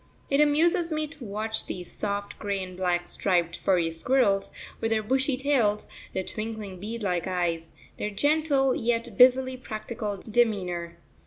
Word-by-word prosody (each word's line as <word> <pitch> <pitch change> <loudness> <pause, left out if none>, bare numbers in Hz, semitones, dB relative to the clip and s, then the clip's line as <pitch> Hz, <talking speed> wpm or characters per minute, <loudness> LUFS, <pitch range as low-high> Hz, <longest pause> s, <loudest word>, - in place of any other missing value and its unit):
It 275 +1 +4
amuses 330 +3 +3
me 310 0 0
to 300 -3 -11
watch 220 +1 -3
these 180 -1 -6
soft, 200 -1 -3
grey 200 -2 -2
and 185 0 -8
black 175 -1 0
striped, 175 -3 0
furry 175 -4 +2
squirrels, 200 +3 +2 0.3
with 225 - 0
their 220 -1 +1
bushy 265 +3 +1
tails, 250 -7 +2 0.3
their 190 - -1
twinkling 215 -3 -5
bead 220 +3 -5
like 180 -3 0
eyes, 170 -3 -1 0.3
their 210 - -2
gentle 285 +3 +2
yet 235 -1 -1
busily 260 +2 +5
practical 215 -3 -5
demeanour. 190 -6 0
215 Hz, 150 wpm, -27 LUFS, 185-260 Hz, 0.3 s, busily